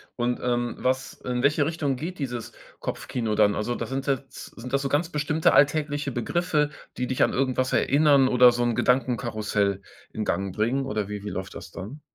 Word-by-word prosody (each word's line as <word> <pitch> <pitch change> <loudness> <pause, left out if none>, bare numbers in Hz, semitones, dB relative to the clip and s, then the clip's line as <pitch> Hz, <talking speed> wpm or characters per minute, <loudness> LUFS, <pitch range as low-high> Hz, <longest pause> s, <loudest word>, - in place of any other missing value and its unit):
Und, 120 0 -1
ähm, 120 -1 -1
was 130 +1 -1
in 125 0 -3
welche 145 +1 +3
Richtung 150 -4 -1
geht 170 +6 -6
dieses 120 -5 -4 0.3
Kopfkino 115 -4 -3
dann? 105 -1 +4
Also, 120 +4 -2
da - - -3
sind 135 +1 -4
jetzt 135 -1 -3
sind 125 +2 -7
das 140 - +2
so 135 - -2
ganz 150 +5 +1
bestimmte 150 0 +1
alltägliche 145 -1 +2
Begriffe, 150 +5 0 0.3
die 125 - -1
dich 130 - -2
an - - +4
irgendwas 130 -1 0
erinnern 140 -1 +4
oder 125 -1 +7
so 120 0 -1
'n 120 -1 +1
Gedankenkarussell 110 -6 0 0.3
in 110 - -2
Gang 95 -2 -2
bringen 125 +6 0
oder 105 -5 -2
wie 105 -1 -5
wie 105 - -4
läuft 95 -1 -5
das 85 - -9
dann? 115 - -8
125 Hz, 195 wpm, -25 LUFS, 115-140 Hz, 0.3 s, oder